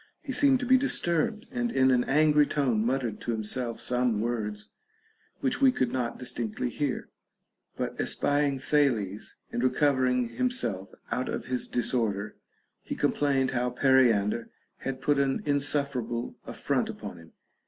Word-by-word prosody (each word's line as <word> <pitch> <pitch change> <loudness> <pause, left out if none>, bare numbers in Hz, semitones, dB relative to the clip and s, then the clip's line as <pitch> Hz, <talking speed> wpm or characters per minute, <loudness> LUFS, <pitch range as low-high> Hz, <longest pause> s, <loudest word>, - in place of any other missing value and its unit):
He 280 - -4
seemed 270 0 +4
to - - -2
be 260 +1 +5
disturbed, 215 - 0
and 245 -1 -1
in 130 - +4
an 125 -1 +3
angry 150 0 +4
tone 125 -7 +1
muttered 125 -2 -1
to 120 - -2
himself 115 +2 -3
some 125 -3 +1
words 105 -3 -3 0.7
which - - -1
we 265 -1 +7
could 130 - 0
not 125 -2 -2
distinctly 120 -1 -3
hear; 145 -1 -2 0.7
but - - -3
espying 145 -1 +1
Thales, 125 -8 0 0.2
and 120 - -2
recovering 130 -2 +2
himself 115 - -2 0.2
out 130 - -1
of - - -4
his 125 -1 -1
disorder, 110 -4 -1 0.5
he - - -5
complained 135 -3 +1
how 125 -1 0
Periander 120 -4 +3 0.3
had 130 -1 -5
put 145 -1 +2
an 135 -1 0
insuf 145 0 +1
ferable 120 -1 -3
affront - - -1
upon 85 - -7
him. 80 -1 -16
130 Hz, 145 wpm, -28 LUFS, 115-145 Hz, 0.7 s, we